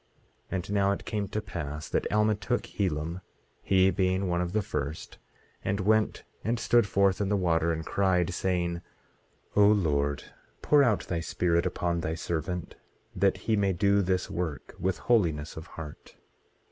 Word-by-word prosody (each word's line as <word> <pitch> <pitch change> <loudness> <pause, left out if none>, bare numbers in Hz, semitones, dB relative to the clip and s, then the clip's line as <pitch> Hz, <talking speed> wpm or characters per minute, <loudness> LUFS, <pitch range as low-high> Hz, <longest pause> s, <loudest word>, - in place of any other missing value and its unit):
18:12 - - -9
And 95 +1 -3
now 100 -1 +3
it 100 - -3
came 105 -2 -2
to 105 +2 -3
pass 75 -6 -5
that - - -1
Alma 105 0 +3
took 120 +4 -1
Helam, 85 -2 -2 0.4
he 95 0 +4
being 95 0 +1
one 85 0 0
of 90 -1 -2
the 110 +2 0
first, 70 -2 -5 0.4
and 95 +1 -1
went 110 +2 +2 0.2
and 115 +3 0
stood 120 -3 +3
forth 100 0 +2
in 100 - 0
the 105 - +2
water, 85 -3 +2
and 80 -1 -3
cried, 95 -2 +1
saying: 85 -2 -1 0.7
O 105 0 +6
Lord, 75 -9 +2 0.4
pour 150 -1 +5
out 115 -6 +2
thy 85 - -3
Spirit 85 0 +1
upon 85 -1 -1
thy 80 0 -2
servant, 85 +1 -3 0.4
that 95 0 +2
he 110 - +3
may 100 -2 +2
do 100 +2 +3
this 90 -1 0
work 80 -6 -4
with 95 0 0
holiness 85 -11 +1
of 80 +2 -8
heart. 75 -4 -10
95 Hz, 170 wpm, -28 LUFS, 85-100 Hz, 0.7 s, O